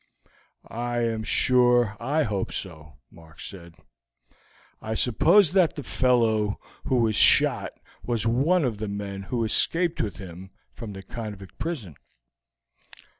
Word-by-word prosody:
"I 120 +1 -3
am 115 -1 -1
sure 120 -1 +3
I 145 +6 0
hope 100 -6 -3
so," 80 -6 -7 0.2
Mark 80 -1 -17
said. 85 -4 -10 1.1
"I 110 +1 -4
suppose 165 - +4
that 185 -4 +3
the 145 - -6
fellow 115 -6 +1 0.3
who 130 - 0
was 115 -3 +2
shot - - +4 0.3
was 120 -3 -2
one 140 +9 +2
of 110 -5 -3
the 110 - -4
men 100 -1 -5
who 115 +4 -3
escaped 165 +9 +1
with 100 -6 -4
him 95 0 -10 0.2
from 110 -4 -8
the 95 0 -9
convict 105 -2 -9
prison." 125 - -5
110 Hz, 130 wpm, -25 LUFS, 100-125 Hz, 1.1 s, suppose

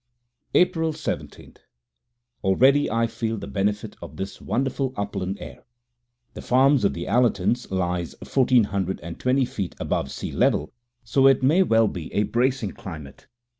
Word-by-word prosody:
April 165 -3 +3
17. - - -6 0.9
Already 130 +9 +4
I 115 +1 +1
feel 115 0 -3
the - - -6
benefit 105 +1 -2
of 75 - -10
this 95 0 -6
wonderful 135 +1 -1
upland 100 -1 -3
air. - - -10 0.7
The - - -8
farm 130 +3 +4
of 100 - +1
the 85 - -4
Allertons 120 -1 +1
lies 90 -2 -2
fourteen 130 -3 +3
hundred 95 -2 -2
and 85 +1 -8
twenty 130 +1 +2
feet 100 -7 -5
above 70 - -1
sea 65 - -5
level, 75 - +1 0.3
so 135 +4 +3
it 135 -1 +4
may 155 +8 +4
well 115 - +4
be 85 -5 -6
a 105 - +3
bracing 120 -1 0
climate. 75 -7 -10
110 Hz, 150 wpm, -24 LUFS, 95-130 Hz, 0.9 s, Already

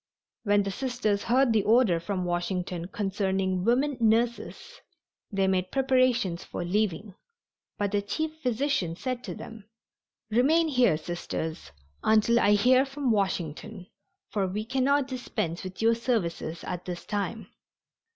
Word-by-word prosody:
When 205 0 +3
the 195 - -3
Sisters 240 -4 -1
heard 250 0 +3
the 215 - +4
order 220 -5 +4
from 185 +1 -3
Washington 175 0 -2
concerning 190 -2 -1
"women 260 +5 +2
nurses," 235 - 0 0.5
they 195 -1 +1
made 185 -1 0
preparations 255 -9 +2
for 175 - -5
leaving, 200 0 -1 0.6
but 205 -1 -1
the 205 -1 +1
chief 315 +10 -2
physician 250 - 0
said 255 +5 -4
to - - -5
them: 225 -2 -10 0.7
"Remain 310 +8 +3
here, 250 - +3
Sisters, 160 - -5 0.3
until 220 +2 +4
I 205 -1 +4
hear 255 +5 +5
from 275 -2 -2
Washington, 190 -1 -2 0.5
for 200 -3 0
we 210 +4 -3
cannot 265 +3 +1
dispense 225 -10 -3
with 185 +3 -6
your 230 +1 +5
services 185 -9 -2
at 180 -1 -5
this 175 -1 -6
time." 205 0 -3
210 Hz, 135 wpm, -27 LUFS, 185-250 Hz, 0.7 s, hear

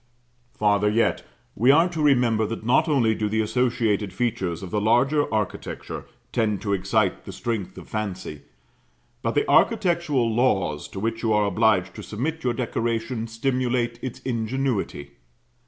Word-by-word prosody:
Farther 105 0 +2
yet. 115 +2 +1 0.3
We 120 +5 +3
are 165 +5 +6
to 165 -3 -4
remember 120 -7 +3
that 110 0 -6
not 125 +8 +3
only 120 -7 +3
do 105 -1 -2
the 110 +1 +1
associated 110 -3 0
features 95 -5 -2
of 90 - -7
the 105 - 0
larger 130 +7 +2
architecture 105 -3 -4 0.2
tend 105 -3 0
to 100 -2 0
excite 95 0 0
the - - -7
strength 115 -5 -4
of - - -10
fancy, 95 -8 -5 0.8
but - - -2
the - - +2
architectural 170 - +2
laws 95 - +1
to 95 - -8
which 115 +2 -2
you 115 - 0
are 105 -1 +3
obliged 100 -2 +2
to - - -8
submit 150 +9 -4
your 125 -2 +1
decoration 115 -1 -2
stimulate 120 0 -1
its 130 -1 -5
ingenuity. 115 - -2
115 Hz, 155 wpm, -24 LUFS, 105-125 Hz, 0.8 s, are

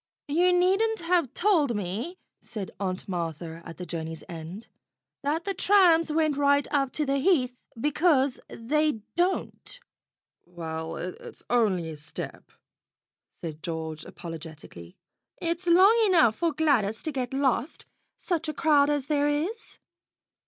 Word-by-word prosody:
"You 350 +5 +4
needn't 390 +5 +2
have 335 -6 +1
told 325 - +3
me," 210 - -4 0.2
said 210 -5 -6
Aunt 185 -2 -3
Martha 165 -2 -4
at 165 - -9
the 180 - -6
journey's 160 -2 -5
end, 170 +5 -8 0.5
"that 300 +4 -1
the 395 - -1
trams 350 -6 +4
went 310 -2 +1
right 285 0 +3
up 275 -3 +1
to 305 - 0
the 275 0 +1
Heath, 265 -6 +2 0.2
because 295 -1 +2
they 300 +1 0
don't." 370 +7 -1 0.6
"Well, 165 -2 -6
it's 180 +1 -7
only 205 -8 +2
a 155 - -8
step," 155 +2 -8 0.8
said 160 -2 -7
George 160 -2 -4
apologetically. 155 - -10 0.4
"It's 340 +1 -2
long 375 +6 +7
enough 285 - +5
for 335 -1 +1
Gladys 265 -9 +1
to 315 - -2
get 255 -3 -3
lost, 270 +1 0 0.3
such 325 -4 -2
a 305 - -4
crowd 290 -3 +4
as 290 -3 0
there 290 -1 +1
is. 330 +11 -2
275 Hz, 135 wpm, -27 LUFS, -, 0.8 s, long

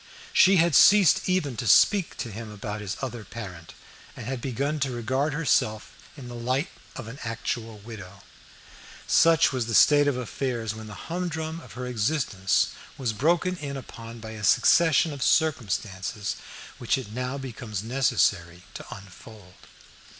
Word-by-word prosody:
She 195 +1 +6
had 170 -1 +3
ceased 195 +2 +6
even 155 -9 0
to 115 - -3
speak 190 - +4
to 115 - -5
him 110 +2 -7
about 105 +1 -6
his 100 -1 -5
other 120 -4 -5
parent, 95 -8 -9 0.4
and - - -7
had 130 0 -4
begun 140 +4 -2
to 135 -1 0
regard 130 +4 -1
herself 110 -8 0 0.2
in 130 -3 -9
the 120 - -8
light 130 +6 -1 0.3
of 120 - -7
an 120 +5 -9
actual 115 -1 -4
widow. 100 -3 -11 0.8
Such 165 -3 +4
was 125 -3 -2
the 115 - -1
state 145 +4 +6
of 140 -3 +1
affairs 120 -2 -3
when 110 0 -9
the 105 - -9
humdrum 165 -2 -3
of - - -13
her 125 +1 -6
existence 115 - 0 0.3
was 120 -4 -2
broken 170 - +1
in 140 -3 -5
upon 115 -2 -10
by 110 0 -8
a 110 -1 -8
succession 160 - +4
of 140 - -8
circumstances 110 -8 0 0.4
which 120 - +1
it 125 -6 -7
now 125 +3 -3
becomes 115 -6 -6
necessary 100 -8 0
to - - -8
unfold. 100 -2 -12
120 Hz, 155 wpm, -26 LUFS, 110-145 Hz, 0.8 s, She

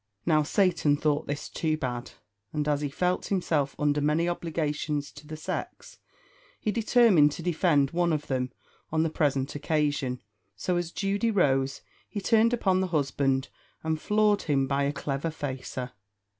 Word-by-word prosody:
Now 155 -1 +4
Satan 160 -2 +2
thought 150 0 0
this 145 +1 -3
too 155 -1 -1
bad; 125 -4 -4 0.4
and 150 -1 -2
as 145 -1 +1
he 145 - -1
felt 180 +6 -1
himself 155 -8 0
under 150 0 +1
many 155 +4 +2
obligations 155 -3 -2
to 145 +1 -13
the 155 0 -6
sex, 155 - -6 0.6
he 215 - -1
determined 215 - +4
to 165 - -7
defend 160 -5 +2
one 175 0 +1
of 150 -2 -1
them 130 -2 -1 0.4
on 160 0 +2
the 165 - -1
present 140 -3 0
occasion; 145 -4 0 0.4
so 180 - -1
as 175 -1 -1
Judy 200 +4 0
rose, 135 -10 +1 0.3
he 210 - -4
turned 225 +2 +3
upon 195 -6 +2
the 190 - 0
husband, 140 -4 0 0.3
and 160 -1 -1
floored 210 -1 +3
him 140 -3 +1
by 140 +1 0
a 140 - +1
clever 140 +2 -3
facer. 130 -4 -5
150 Hz, 160 wpm, -28 LUFS, 140-175 Hz, 0.6 s, Now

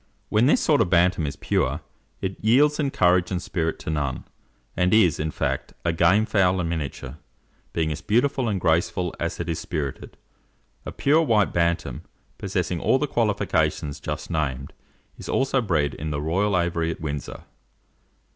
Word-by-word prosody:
When 110 +4 +3
this 150 - +4
sort 150 -5 +3
of 95 - +1
Bantam 85 -3 +3
is 70 - -4
pure, - - -1 0.4
it 95 0 -3
yields 145 +7 +4
in 145 -2 +1
courage 90 -6 +2
and 90 - -1
spirit 85 -2 -2
to - - -4
none, 70 -4 -2 0.5
and 90 +3 +2
is, 95 -8 +4
in 80 +1 -1
fact, - - -3
a 85 - +2
game 90 +6 +4
fowl 95 -3 +2
in 85 -2 -1
miniature, 75 -3 -5 0.5
being 80 -2 -1
as 75 - -5
beautiful 125 +3 +1
and 100 -3 -1
graceful 85 +1 0
as 85 0 -3
it 85 - -3
is 85 -1 -2
spirited. 75 -5 -5 0.7
A - - -4
pure 150 +4 +3
white 110 - +2
Bantam, 85 -7 0 0.4
possessing - - -2
all - - +3
the - - 0
qualifications 70 -1 0
just 75 +3 -5
named, 70 -4 -2 0.5
is - - -8
also 135 0 +1
bred 75 -10 0
in 80 - -5
the 75 -1 -2
royal 95 +6 +1
aviary 85 -1 -1
at 80 - -4
Windsor. 75 -2 -5
85 Hz, 170 wpm, -24 LUFS, 80-105 Hz, 0.7 s, this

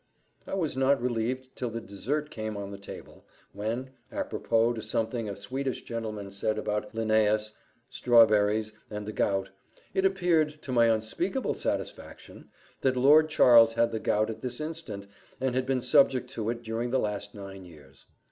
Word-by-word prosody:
I - - -3
was 165 -8 -1
not 135 +1 +3
relieved 125 +2 -2
till 125 - -3
the 115 0 -4
dessert 135 +9 -3
came 110 -2 -4
on 100 0 -6
the 100 - -8
table, 100 - -11 0.3
when, 115 +6 -3 0.2
apropos 115 +1 +1
to 110 - -5
something 110 +1 -2
a 100 - -4
Swedish 130 +6 -4
gentleman 110 -4 -5
said 100 +2 -1
about 105 +1 -3
Linnaeus, 110 -1 +2 0.3
strawberries, 110 -2 +4 0.2
and 105 -1 -5
the 105 - -4
gout, 95 -2 0 0.4
it 190 - +1
appeared, 170 -6 +2
to 130 - -6
my 120 -2 +5
unspeakable 115 - 0
satisfaction, - - -5 0.3
that 130 -1 +2
Lord 150 +5 +6
Charles 115 -6 +7
had 115 0 +2
the 110 - -2
gout 110 +1 +1
at 110 - -9
this 125 -1 -5
instant, 155 -10 -6 0.3
and 130 -1 0
had 130 0 -1
been 130 -1 +1
subject 130 0 +3
to 110 -1 -3
it 120 0 -3
during 115 +2 -2
the 130 - +1
last 105 -3 -3
nine 95 -1 -9
years. 75 -6 -16
115 Hz, 165 wpm, -28 LUFS, 105-130 Hz, 0.4 s, Charles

